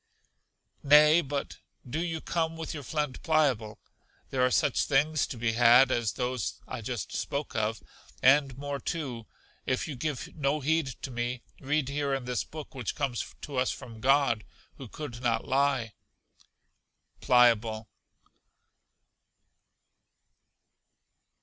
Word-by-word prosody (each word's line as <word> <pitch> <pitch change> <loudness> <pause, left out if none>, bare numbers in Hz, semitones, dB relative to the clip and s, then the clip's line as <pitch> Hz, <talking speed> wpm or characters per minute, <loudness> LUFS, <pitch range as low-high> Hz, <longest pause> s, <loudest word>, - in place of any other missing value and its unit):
Nay, 150 +3 +7
but 140 -2 -4 0.3
do 140 +6 -3
you 165 -2 -3
come 165 -1 -1
with 160 -1 -5
your 150 - -5
friend 150 0 -3
Pliable; 130 -10 +1 0.5
there 130 -1 +1
are 125 - +4
such - - +2
things 150 +2 +2
to 125 - -7
be 115 0 0
had 120 +3 +6
as 120 -5 0
those 125 -5 -3
I - - -5
just - - -5
spoke 140 +1 -3
of, 110 0 -1 0.4
and 135 0 +4
more 140 0 -4
too. 130 -10 -4 0.4
If 130 +4 0
you 150 - -5
give 145 0 -4
no 145 0 0
heed 160 +1 +1 0.2
to 135 - -4
me, 120 +1 -3 0.2
read 145 0 0
here 140 0 -1
in 135 -2 -5
this 125 -1 -1
book 155 0 -9
which 125 -6 -4
comes 135 -5 -3
to 140 -3 -6
us 125 0 +2
from 115 -2 -7
God, 135 -4 +3 0.3
who 135 - -9
could 125 -1 -7
not 120 -2 0
lie. 135 -4 +1 1.3
Pliable. 115 -3 +3
135 Hz, 135 wpm, -29 LUFS, 120-150 Hz, 1.3 s, Nay